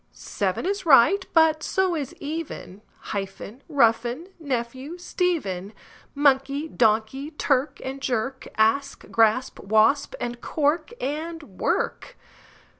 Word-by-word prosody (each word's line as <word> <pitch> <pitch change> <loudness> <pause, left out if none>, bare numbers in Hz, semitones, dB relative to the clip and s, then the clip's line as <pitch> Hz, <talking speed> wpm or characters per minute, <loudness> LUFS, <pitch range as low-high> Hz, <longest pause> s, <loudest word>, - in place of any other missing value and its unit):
Seven - - -3
is 395 +1 -1
right, 330 +6 +5
but 320 -1 +4
so 380 +2 +1
is 285 -5 -4
even; 290 - -6 0.3
Hyphen, 200 +4 -6
roughen, 245 +3 +2
nephew, 265 +2 -4
Stephen; 300 - -2 0.4
Monkey, 280 +1 +2
donkey; 225 +3 +1
clerk 285 -2 0
and 270 +1 -5
jerk; 260 +1 -2
Asp, 225 +6 +1
grasp, 225 +3 +2
wasp; 220 - +2
and 240 0 -4
cork 305 +6 0
and 315 +4 -4
work. 250 - -2
275 Hz, 110 wpm, -24 LUFS, 230-315 Hz, 0.4 s, right